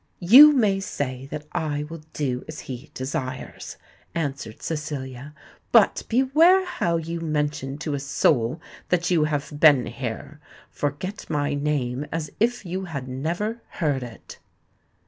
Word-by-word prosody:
"You 255 +12 +9
may 210 -8 +2
say 135 -8 -4
that 150 +1 -6
I 150 -4 -2
will 160 +1 -8
do 130 -4 -2
as 155 -1 -7
he 130 +3 -8
desires," 130 -1 -5 0.4
answered 140 -8 -4
Cecilia: 145 -3 -5 0.4
"but - - +5
beware 310 +10 +5
how 170 - 0
you 165 +1 -4
mention 150 -3 -2
to 150 0 -3
a 140 - -1
soul 135 -1 +1 0.3
that 175 0 +1
you 160 -4 +4
have 150 -1 -2
been 145 -5 +6
here. 135 +4 -6 0.3
Forget 150 +9 -4
my 145 -2 0
name 145 -2 -1
as 155 -2 -3
if 240 -1 +1
you 185 +2 -3
had 140 -7 -5
never 170 - -3
heard 145 -6 0
it." 120 -2 -10
150 Hz, 140 wpm, -24 LUFS, 135-170 Hz, 0.4 s, You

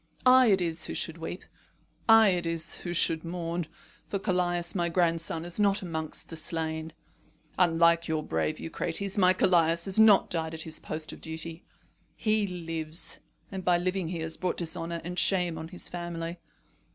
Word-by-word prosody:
I 255 0 +7
it 195 -3 +4
is 165 -1 0
who - - -5
should 165 0 -3
weep. 165 +3 -6 0.6
I 225 -1 +8
it 175 -2 0
is 165 -1 0
who 175 - -5
should 165 -2 +2
mourn. 170 -1 -3 0.4
For 200 - -2
Callias, 175 -2 0
my 175 -2 0
grandson, 165 -1 0
is 175 +3 -3
not 200 -1 +2
amongst 160 -3 -5
the 165 - -7
slain. 160 0 -3 0.7
Unlike 170 -1 +4
your 155 -1 -1
brave 155 - -1
son - - -10
Eucrates, 175 +4 -2
my 185 -1 +6
Callias 170 -2 +3
has 195 +2 +2
not 215 -3 +6
died 160 -1 -1
at 160 - -2
his 160 - -4
post 155 0 -4
of - - -12
duty. 160 +1 -4 0.5
He 215 -2 +1
lives, 165 -2 -3 0.3
and 190 -1 -5
by 180 0 +3
living 185 0 -1
he 165 -1 -4
has 160 0 -2
brought 185 - -2
dishonour 170 0 -2
and 180 +2 -3
shame 180 -4 +2
on 160 - -6
his 180 +1 -5
family. 170 -1 -5
170 Hz, 175 wpm, -28 LUFS, 165-180 Hz, 0.7 s, I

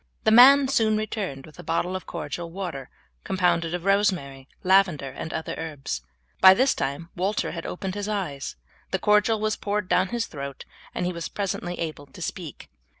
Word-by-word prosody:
The 220 - +4
man 265 +4 +8
soon 220 -5 +2
returned 200 -10 -4
with 155 -2 -16
a - - -8
bottle 175 +2 -1
of 185 - -6
cordial 170 -1 -5
water 165 -8 -5 0.3
compounded 175 -2 +1
of 180 0 -6
rosemary, 180 -10 +1 0.2
lavender, 185 -8 +3
and 160 +4 -6
other 160 - -3
herbs. 145 - -4 0.4
By 190 0 +9
this 260 +5 +3
time 140 +5 -3
Walter 195 +3 -1
had 165 -1 -5
opened 190 0 -4
his 205 0 -4
eyes. 175 -10 -3 0.3
The - - 0
cordial 210 +1 +3
was 215 0 0
poured 205 -1 -2
down 185 +1 +3
his 235 +2 -2
throat, 140 -2 -7 0.3
and - - -1
he 180 - -1
was 170 -1 -5
presently 180 -3 -3
able 155 -3 -5
to - - -13
speak. - - -7
180 Hz, 180 wpm, -25 LUFS, 160-210 Hz, 0.4 s, By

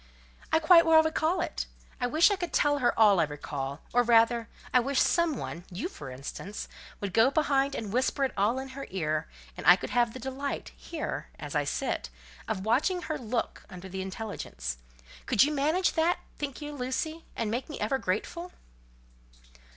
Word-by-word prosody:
"I - - +5
quite 335 +1 +7
well 320 -1 +7
recall 315 +3 +1
it. 345 - -3 0.3
I 245 - +1
wish 315 - +5
I - - +3
could 350 -3 -4
tell 290 -1 +3
her 245 - +2
all 205 -4 +6
I - - +5
recall; 145 -1 -5
or 245 - +5
rather, 230 -1 +4 0.2
I 250 - +7
wish 270 +2 +1
some 340 -5 +2
one, 170 -5 -6
you 185 - -3
for 150 - -9
instance, 140 +10 -6 0.3
would 200 -3 -4
go 225 +3 +6
behind 280 -2 +1
and 210 -2 -4
whisper 260 +3 +1
it 265 - +1
all 210 +5 +2
in 265 0 -5
her 275 +1 -7
ear, 155 -4 -1 0.3
and - - -8
I 180 - +10
could - - -6
have 240 -2 +2
the - - -6
delight—here, 280 +4 -5
as - - -7
I - - +1
sit—of 210 -3 -4
watching 310 - +2
her 310 - -3
look 235 -1 -3
under 185 -1 -9
the 190 0 -5
intelligence. 190 - -5 0.5
Could 240 -3 +5
you 300 +2 +1
manage 310 +6 +2
that, 335 +2 +2 0.2
think 285 0 -5
you, 295 0 -5
Lucy, 290 +5 -3
and 225 -2 -1
make 245 +6 -3
me 300 - -6
ever 270 -1 0
grateful?" 340 - -3
255 Hz, 180 wpm, -29 LUFS, 205-305 Hz, 0.5 s, I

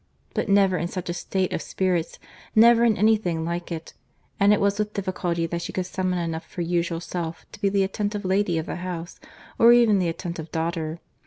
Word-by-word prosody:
—But - - -2
never 195 -2 +4
in 170 - -1
such 180 -1 -4
a - - -2
state 185 +1 -2
of - - -2
spirits, 180 -3 -1 0.4
never 230 +1 +7
in 225 -3 +3
any 215 +3 +4
thing 170 -6 -2
like 170 +1 -4
it; 165 -1 -6 0.5
and 200 0 +5
it 210 - +4
was 200 +1 +1
with 210 0 -1
difficulty 180 -3 -1
that 170 +1 -3
she - - -5
could 185 - -2
summon 185 0 -1
enough 165 -1 -3
of - - -23
her 175 - -2
usual 170 0 -1
self 170 -1 -5
to - - -13
be 200 - +3
the 195 0 +2
attentive 205 +1 -2
lady 190 -2 +1
of 160 - -2
the - - -5
house, 175 -2 -6 0.4
or 235 +1 +8
even 230 -4 +5
the 175 -2 +1
attentive 165 -1 -6
daughter. 165 0 -2
180 Hz, 220 wpm, -24 LUFS, 170-200 Hz, 0.5 s, or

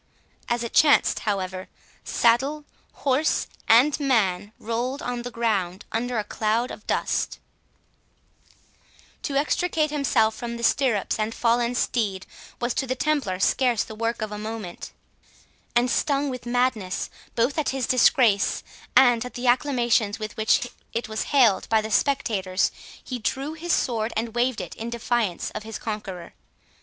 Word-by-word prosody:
As 240 0 0
it 235 - -5
chanced, 300 -2 +5
however, 185 -2 -3 0.4
saddle, 270 +6 +2 0.4
horse, 275 +3 +2 0.2
and 255 +7 +5
man, 210 -8 +1
rolled 240 +5 -3
on 245 -1 -3
the 245 - -5
ground 205 -6 -1
under 240 +2 -1
a 215 - 0
cloud 220 +4 -1
of 210 - -10
dust. - - -1 1.8
To 280 - -3
extricate 305 +2 +1
himself 250 -7 +2
from 235 +1 -5
the 235 - -7
stirrups 230 -5 +1
and 215 +1 -1
fallen 240 +1 +1
steed, 205 -6 -1 0.3
was 240 0 -1
to 265 - -1
the 255 - -1
Templar 260 -10 0
scarce 240 +2 +2
the - - -9
work 230 +1 -2
of 215 - -4
a 210 - -5
moment; 215 -5 -6 0.8
and, 240 +1 +4
stung 280 +2 +1
with 250 -2 -7
madness, 240 -6 0 0.2
both 245 +6 +1
at 300 - 0
his 265 -2 -1
disgrace 235 -5 +3 0.3
and 245 -3 +6
at 250 - -8
the 245 - -4
acclamations 240 -5 +2
with 215 -1 -6
which 220 +3 +2 0.3
it 230 0 -2
was 220 0 -2
hailed 245 -9 +4
by 220 - +4
the 215 0 -4
spectators, 210 -8 +1 0.3
he 250 -2 -5
drew 270 +7 -2
his 335 +2 -4
sword 230 -5 0
and 225 0 -2
waved 240 0 0
it - - -7
in 230 +1 -6
defiance 235 -5 -1
of - - -5
his 220 0 -6
conqueror. 195 -6 -6
235 Hz, 150 wpm, -25 LUFS, 215-255 Hz, 1.8 s, and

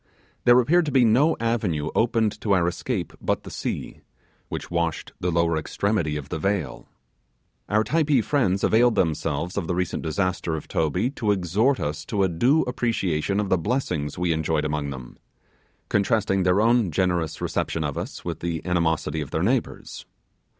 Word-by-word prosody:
There 120 +1 +7
appeared 160 +6 +3
to - - -1
be 130 -2 +4
no 135 +9 +3
avenue 105 -10 -1
opened 110 -2 +1
to 100 - +1
our 90 -3 +3
escape 90 +2 -3
but - - -1
the - - -9
sea, - - -4 0.5
which - - -6
washed 85 -2 -2
the 90 - -1
lower 85 -1 +2
extremities 80 -1 -1
of 70 -1 -7
the 80 - -3
vale. 95 -7 -2 0.8
Our 110 +1 +3
Typee 150 -3 +2
friends 100 -10 +1
availed 120 +1 +4
themselves 80 +2 -1
of 90 -5 -2
the 90 - -1
recent 90 -2 -2
disaster 90 0 -1
of 80 - -7
Toby 90 - 0
to 115 -6 -3
exhort 100 - +1
us 75 +2 -3
to 100 -3 0
a 95 - +2
due 125 - +3
appreciation 100 -7 -1
of 105 -2 -1
the 95 - +2
blessings 90 - -2
we 90 -1 +1
enjoyed 80 -1 0
among 75 -1 -2
them, 65 -3 -9 0.7
contrasting 100 -1 +1
their 90 +2 +3
own 115 -3 +3
generous 85 -2 0
reception 80 - -2
of 75 -1 -3
us - - -6
with - - -4
the 85 -2 -3
animosity 80 -3 0
of 70 - -6
their 80 - -1
neighbours. 120 +5 -2
90 Hz, 170 wpm, -24 LUFS, 80-115 Hz, 0.8 s, There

